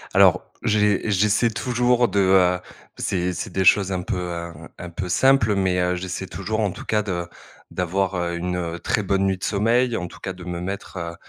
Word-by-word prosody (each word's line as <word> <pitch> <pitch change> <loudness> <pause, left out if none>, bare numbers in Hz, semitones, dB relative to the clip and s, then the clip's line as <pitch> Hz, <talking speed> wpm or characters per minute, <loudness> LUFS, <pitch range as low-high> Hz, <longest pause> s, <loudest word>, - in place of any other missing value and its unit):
Alors, - - +4
j'e 105 -2 +3
j'essaie 105 +3 +2
toujours 125 +1 +2
de, 100 - 0
heu, 95 -1 +4 0.4
c'est 90 -1 -1
c'est - - -5
des 95 - 0
choses 95 +1 +4
un 90 -1 -1
peu, 95 0 -3
heu, 85 -1 -4
un 80 -1 -12
un 90 - -7
peu 90 +2 -5
simples 115 +2 +3
mais, 95 -2 +1
heu, 90 0 +1
j'essaie 90 +1 -4
toujours 100 +4 -3
en 100 -3 +1
tout - - -9
cas 105 -1 +1
de 85 -3 -3 0.4
d'avoir, 95 +1 -1
heu, 85 -1 -2
une, 90 +1 -2
heu, 85 -1 -4
très 105 - -1
bonne 95 0 +1
nuit 95 -1 +1
de - - -13
sommeil. 115 +4 +2
En 90 - -4
tout - - -13
cas 95 - -5
de 90 -1 -11
me 90 -1 -5
mettre, 95 0 -6
heu 85 -1 -5
95 Hz, 220 wpm, -23 LUFS, 90-105 Hz, 0.4 s, Alors